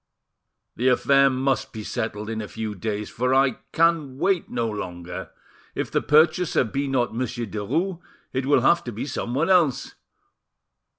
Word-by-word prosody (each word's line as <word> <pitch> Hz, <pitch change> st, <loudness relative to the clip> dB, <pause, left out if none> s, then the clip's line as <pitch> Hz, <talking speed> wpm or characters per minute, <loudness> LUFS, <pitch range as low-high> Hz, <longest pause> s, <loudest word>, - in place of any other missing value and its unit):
"The 125 Hz, -, +1 dB
affair 135 Hz, +2 st, +4 dB
must 135 Hz, +1 st, -1 dB
be 110 Hz, -2 st, -6 dB
settled 105 Hz, 0 st, -4 dB
in 110 Hz, 0 st, -3 dB
a 105 Hz, -, -6 dB
few 110 Hz, -1 st, -5 dB
days, 105 Hz, +1 st, -3 dB
for 125 Hz, +2 st, +1 dB
I 135 Hz, 0 st, +3 dB
can 165 Hz, -5 st, +2 dB
wait 185 Hz, +3 st, +1 dB
no 115 Hz, -, -1 dB
longer; 90 Hz, -5 st, -6 dB, 0.5 s
if -, -, -3 dB
the -, -, +1 dB
purchaser 155 Hz, +2 st, +3 dB
be 135 Hz, +4 st, -2 dB
not 125 Hz, -4 st, 0 dB
Monsieur 120 Hz, 0 st, -3 dB
Derues, 160 Hz, -, -2 dB, 0.3 s
it 130 Hz, 0 st, -1 dB
will 145 Hz, -, +4 dB
have 170 Hz, 0 st, +4 dB
to 120 Hz, -, -4 dB
be 110 Hz, +3 st, -5 dB
someone 140 Hz, +5 st, -1 dB
else. 165 Hz, -8 st, +2 dB
130 Hz, 160 wpm, -24 LUFS, 110-150 Hz, 0.5 s, affair